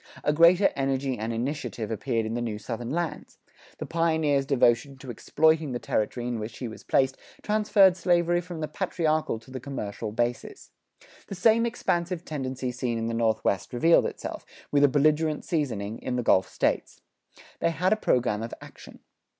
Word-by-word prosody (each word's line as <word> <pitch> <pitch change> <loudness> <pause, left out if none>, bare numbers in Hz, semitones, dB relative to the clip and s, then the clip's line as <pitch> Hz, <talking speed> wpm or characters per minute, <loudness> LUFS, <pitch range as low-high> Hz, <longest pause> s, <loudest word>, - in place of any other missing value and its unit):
A 150 - +2
greater 170 +5 +5
energy 135 -1 -1
and 110 +2 -2
initiative 120 -2 -3
appeared 115 +1 -1
in 110 - -3
the 120 - -2
new 110 -3 -3
Southern 115 +2 -5
lands; 170 +3 -4 0.4
the - - -5
pioneer's 160 -4 +1
devotion 135 +1 +2
to 130 -1 -8
exploiting 155 +4 +1
the - - -1
territory 120 +1 -2
in 120 -2 -2
which 110 +1 -6
he 125 - -4
was 110 - -10
placed 130 0 +1 0.3
transferred 210 -3 +4
slavery 175 -1 +2
from 175 -2 -8
the 155 - -2
patriarchal 155 - -1
to 115 +3 -16
the 130 - -5
commercial 110 -6 -5
basis. 120 +2 -3 0.6
The 195 - -6
same 225 +4 +4
expansive 175 -6 -2
tendency 130 -3 -3
seen 125 -1 -2
in 115 0 -2
the - - -3
Northwest 110 -3 0
revealed 165 +8 +4
itself, - - -6 0.3
with 145 0 +3
a - - +8
belligerent 150 +2 +1
seasoning, 115 - -2
in 125 - -3
the 125 - -1
Gulf 95 -4 +3
States. - - -1 0.6
They 170 - +2
had 180 +4 +1
a - - +2
program 120 - +1
of 115 - -5
action. - - -14
135 Hz, 175 wpm, -26 LUFS, 115-165 Hz, 0.6 s, a